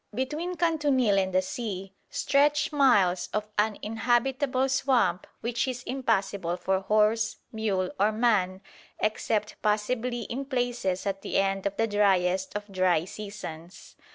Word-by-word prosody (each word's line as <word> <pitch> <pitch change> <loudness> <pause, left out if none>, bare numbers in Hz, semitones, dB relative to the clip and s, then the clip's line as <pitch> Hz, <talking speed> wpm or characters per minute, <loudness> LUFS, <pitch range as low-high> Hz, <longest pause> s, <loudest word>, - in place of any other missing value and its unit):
Between 305 +8 -2
Kantunil 290 - +2
and 190 -1 0
the 185 0 +2
sea 195 -3 -5 0.2
stretch 295 +2 +2
miles 205 -11 +3
of 210 +1 -1
uninhabitable 240 +5 +1
swamp 255 -9 +1
which 235 +2 -1
is 250 -1 -4
impassable 200 -8 -1
for 190 +1 0
horse, 215 +3 +2 0.2
mule 200 -5 -1
or 205 +2 +4
man 210 -5 +1 0.4
except 215 0 -1
possibly 235 +3 0
in 260 +5 -4
places 245 -8 -1
at 195 -1 -2
the - - -2
end 195 0 +1
of 200 0 -5
the 225 - +2
driest 190 -3 +1
of 205 - -8
dry 185 -3 +2
seasons. 185 -4 -9
215 Hz, 130 wpm, -27 LUFS, 195-250 Hz, 0.4 s, or